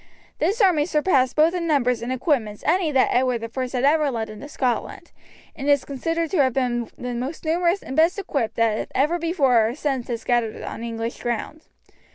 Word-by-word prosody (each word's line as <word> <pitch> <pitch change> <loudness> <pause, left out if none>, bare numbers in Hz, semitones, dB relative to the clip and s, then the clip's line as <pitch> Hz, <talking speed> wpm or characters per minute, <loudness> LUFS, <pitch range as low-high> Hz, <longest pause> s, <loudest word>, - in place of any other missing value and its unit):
This 435 +5 +1
army 335 -6 +4
surpassed 295 -6 +2
both 315 +3 +4
in 345 -2 -2
numbers 250 -6 +1
and 240 +2 -4
equipments 245 -6 -1
any 335 0 +2
that 265 -2 +3
Edward 245 -2 +1
I 260 - -1
had 255 0 -2
ever 300 +1 +3
led 225 -4 -3
into 215 +7 -10
Scotland, 255 -4 -3 0.4
and 280 0 -3
is 285 -2 +3
considered 330 +4 -2
to 355 - +3
have 260 -2 +2
been 240 -3 -1
the 250 0 -5
most 260 +8 -5
numerous 345 +4 +1
and 265 - -6
best 325 +5 +3
equipped 270 - -2
that 225 -2 0
ever 305 +6 +2
before 275 -10 +3
or 235 - -4
since 270 -5 -2
has 235 -2 -4
gathered 240 -3 0
on - - -6
English 230 0 -4
ground. 240 +6 -4
265 Hz, 195 wpm, -23 LUFS, 240-315 Hz, 0.4 s, army